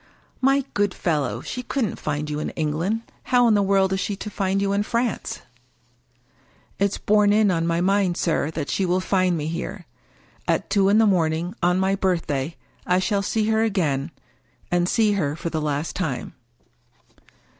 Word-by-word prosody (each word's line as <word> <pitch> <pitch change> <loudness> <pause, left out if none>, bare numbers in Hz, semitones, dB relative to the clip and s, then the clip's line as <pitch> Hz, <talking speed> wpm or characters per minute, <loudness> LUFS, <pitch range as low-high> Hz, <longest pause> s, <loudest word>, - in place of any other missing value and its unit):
" - - -36
My 275 0 +2
good 205 -2 0
fellow! 150 -6 -1
she 250 - -5
couldn't 250 -4 -2
find 150 0 -2
you 150 0 -3
in - - -3
England. 165 +9 -1 0.2
How 245 -1 +4
in 225 - +4
the 205 - +4
world 195 -1 +2
is 190 - 0
she 205 - -2
to 210 +2 -7
find 195 -1 0
you 200 0 0
in 200 - +2
France? 235 +3 -2 0.4
" - - -40
" - - -35
It's 200 0 +1
borne 210 0 +3
in 210 -1 +4
on 165 -1 0
my 170 0 +1
mind, 190 -1 +2
sir, 155 -3 0
that 155 -3 -4
she 195 - 0
will 180 0 +1
find 185 -2 +1
me 150 - -3
here. 175 +3 -5 0.6
At - - 0
two 195 -2 +4
in 205 - +4
the 225 - +5
morning 170 -2 +1
on 180 +1 +3
my 190 +1 +2
birthday 165 -6 -1 0.3
I 180 - +2
shall 200 +2 +1
see 215 +2 0
her 220 0 +2
again, 165 -10 0 0.6
and 175 0 +2
see 220 -2 +3
her 155 -8 0
for 165 +1 -4
the 160 - -1
last 150 +1 -2
time." 140 -10 -3
185 Hz, 190 wpm, -23 LUFS, 165-205 Hz, 0.6 s, the